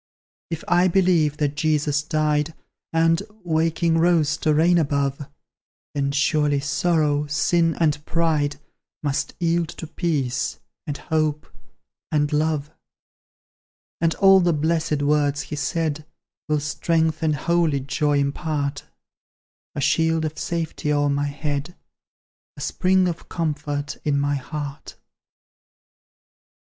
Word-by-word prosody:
If 165 -1 -4
I 175 +1 +4
believe 170 -5 +2
that 145 -1 -1
Jesus 150 -1 +1
died, 155 0 0 0.4
And 165 +1 +3 0.2
waking, 165 0 +1
rose 160 -3 +3
to 155 - +1
reign 170 +3 +4
above; 140 -2 -1 0.7
Then 140 -1 0
surely 145 0 +2
Sorrow, 150 0 +1
Sin, 165 +2 +2
and 150 -3 +1
Pride, 155 -3 0 0.5
Must 140 -2 -1
yield 170 -1 +1
to - - -7
Peace, 145 -6 -2 0.3
and 145 -1 -3
Hope, 155 -1 -1 0.7
and 150 -1 +1
Love. 150 -1 0 1.3
And 165 -1 +2
all 195 -1 +6
the 175 -2 +2
blessed 155 -1 0
words 145 0 +2
He 150 - -6
said 155 +1 -1 0.5
Will 150 -1 +2
strength 160 +2 0
and 155 -2 +1
holy 165 -1 +1
joy 145 +2 0
impart: 140 0 -2 0.9
A - - -2
shield 160 +2 +2
of 155 0 -4
safety 165 -3 -2
o'er 145 0 +2
my 140 +1 0
head, 145 +3 -4 0.8
A - - -8
spring 185 0 +2
of 170 -2 -5
comfort 150 -3 -3
in 145 -2 +1
my 145 0 +1
heart. 145 +1 -6
155 Hz, 120 wpm, -23 LUFS, 145-165 Hz, 1.3 s, all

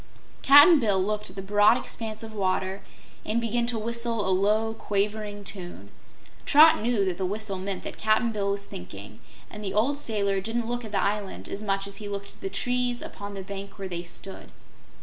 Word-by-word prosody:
Cap'n 290 +4 +8
Bill 205 -6 +2
looked 210 +2 -1
at 185 - -13
the 195 - -5
broad 205 +4 +5
expanse 220 -3 -5
of 220 -1 -8
water 190 -1 -1 0.4
and 220 +2 0
began 235 +1 0
to 240 -1 +1
whistle 230 -1 -2
a - - +2
low, 215 +4 +2
quavering 205 0 -2
tune. 175 - -6 0.6
Trot 310 -1 +7
knew 225 -3 +1
that 185 -1 -2
the 190 - 0
whistle 200 -1 -4
meant 190 0 -4
that - - -7
Cap'n 220 +2 +2
Bill 200 -2 -1
was 200 0 -2
thinking, 100 - -10 0.3
and 210 - -8
the 195 - -3
old 275 +7 +2
sailor 200 -7 0
didn't 225 +3 -2
look 240 +1 -3
at 220 - -8
the 205 - 0
island 205 -1 -2
as 200 - -5
much 195 -2 -1
as 200 0 -6
he 210 - -7
looked 200 0 -6
at - - -23
the 195 - -3
trees 245 +3 -1
upon 200 0 -8
the 195 - -6
bank 200 +1 -8
where 195 -1 -5
they 175 -2 -4
stood. 190 +2 -7
205 Hz, 205 wpm, -26 LUFS, 195-225 Hz, 0.6 s, Cap'n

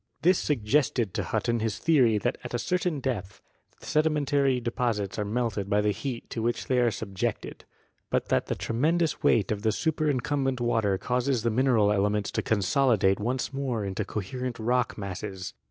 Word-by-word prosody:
This 180 +2 +5
suggested 125 -4 +1
to - - -1
Hutton 120 -1 0
his 110 -1 -1
theory 130 -9 +3
that 120 +4 0
at - - -5
a - - +2
certain 175 0 -1
depth 100 -8 -3 0.4
the - - -14
sedimentary 145 -4 +2
deposits 115 -4 -2
are 105 - -1
melted 105 -3 -2
by 105 - +3
the 105 0 +2
heat 120 +3 -5
to 115 - -3
which 120 +1 -1
they 130 -1 +1
are 120 -1 +4
subjected, 100 -2 -4 0.4
but - - -1
that - - +1
the - - -1
tremendous 160 +8 0
weight 105 -3 +3
of 105 -1 -2
the 110 0 +2
superincumbent 140 -2 0
water 115 -5 +1
causes 125 +1 0
the 115 - +1
mineral 115 -4 +3
elements 105 0 +1
to - - -1
consolidate 105 -1 +2
once 125 +5 -2
more 130 -6 -2
into 100 +2 -2
coherent 120 +5 -4
rock 120 +1 0
masses. 95 -1 -5
120 Hz, 170 wpm, -27 LUFS, 105-135 Hz, 0.4 s, This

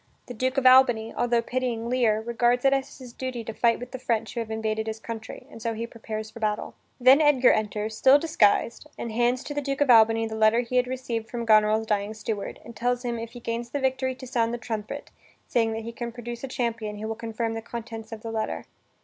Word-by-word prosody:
The 245 - -8
Duke 255 +3 -1
of 270 - +1
Albany, 245 -4 +6
altho 240 -1 +1
pitying 245 -2 -2
Lear, 235 -3 +2
regards 240 +2 +1
it 270 - +5
as 270 -1 -2
his 250 -3 -11
duty 255 -2 -4
to 225 - -6
fight 230 +1 +2
with 245 +1 -8
the 260 - -6
French 225 -3 -1
who 240 - -3
have 225 -1 -4
invaded 220 0 -2
his 220 0 -4
country, 225 -1 -7
and 225 - -11
so 230 0 -2
he 230 +1 -3
prepares 220 -2 -6
for - - -11
battle. 210 -1 -2 0.3
Then 260 +4 +7
Edgar 280 -4 +5
enters, 215 0 -1
still 265 +5 +6
disguised, 290 -4 +2
and 235 - -5
hands 240 +3 +1
to 290 - -5
the 290 - -2
Duke 275 -1 -3
of 285 -3 +4
Albany 225 0 +6
the 220 - -5
letter 220 +2 +4
he 245 +1 -2
had 250 0 +3
received 245 -3 -4
from 235 -1 -4
Goneril's 215 0 +4
dying 210 0 -1
steward, 215 -1 -4
and 235 - -10
tells 245 +2 -1
him 235 -1 -2
if 230 0 -7
he 245 - -8
gains 235 0 -4
the 285 - -2
victory 260 -1 0
to 260 0 -10
sound 240 -2 0
the - - -4
trumpet, 230 +4 -5 0.3
saying 225 -2 +1
that 225 0 -4
he 230 - -5
can 235 0 -5
produce 240 0 -7
a - - -3
champion 230 -4 -3
who 215 +1 -5
will 225 - -2
confirm 225 0 -3
the 225 - -4
contents 225 -1 -7
of 220 -1 -8
the 225 - -5
letter. 220 -1 -3
235 Hz, 240 wpm, -26 LUFS, 220-250 Hz, 0.3 s, Then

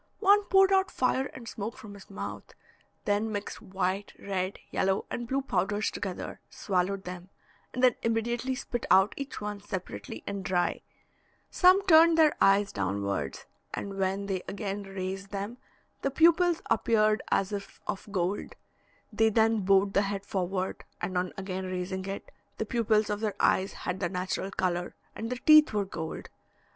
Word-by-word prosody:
One 410 0 +5
poured 385 0 +5
out 380 0 +3
fire 260 +1 +1
and 240 -3 -11
smoke 220 +1 -5
from 210 -2 -10
his 200 -1 -13
mouth; 200 - -7 0.5
then 210 +2 +1
mixed 205 -1 -5
white, 190 +1 -2
red, 190 -1 -3
yellow, 190 0 +1
and 240 0 -3
blue 270 +2 0
powders 205 -2 0
together, 190 -3 -5
swallowed 190 0 -1
them, 180 0 -8 0.4
and 255 - -3
then 250 -2 +7
immediately 235 +3 0
spit 245 -2 -4
out 190 +2 +5
each 275 0 -6
one 210 -1 -4
separately 145 - -6
and 200 -1 -4
dry; 180 -1 0 0.7
some 375 +2 +5
turned 330 -2 +7
their 310 -2 +5
eyes 195 +1 +4
downwards, 100 0 -2 0.3
and 195 -1 -5
when 195 +1 0
they 190 -2 -2
again 200 0 -4
raised 195 0 -5
them 205 +5 -5 0.4
the 275 - +1
pupils 335 +3 +4
appeared 215 -2 +3
as 195 +1 +1
if 200 -1 -6
of 195 - -4
gold; 190 +1 -2 0.6
they 220 +1 +4
then 225 0 +3
bowed 195 +1 +3
the 200 - +4
head 200 0 -3
forward, 185 -1 -2 0.2
and 180 +1 -3
on 180 0 0
again 190 -1 -4
raising 185 +1 -3
it, 195 0 -6 0.3
the 220 - -2
pupils 220 -2 +1
of 205 - -1
their 215 -2 -2
eyes 190 +1 +2
had 180 +1 -4
their - - -1
natural 185 +1 -2
colour, 175 -2 -2 0.2
and 225 - -4
their 250 - -2
teeth 305 -4 +8
were 205 -1 +1
gold. 160 -4 -6
200 Hz, 165 wpm, -29 LUFS, 190-230 Hz, 0.7 s, teeth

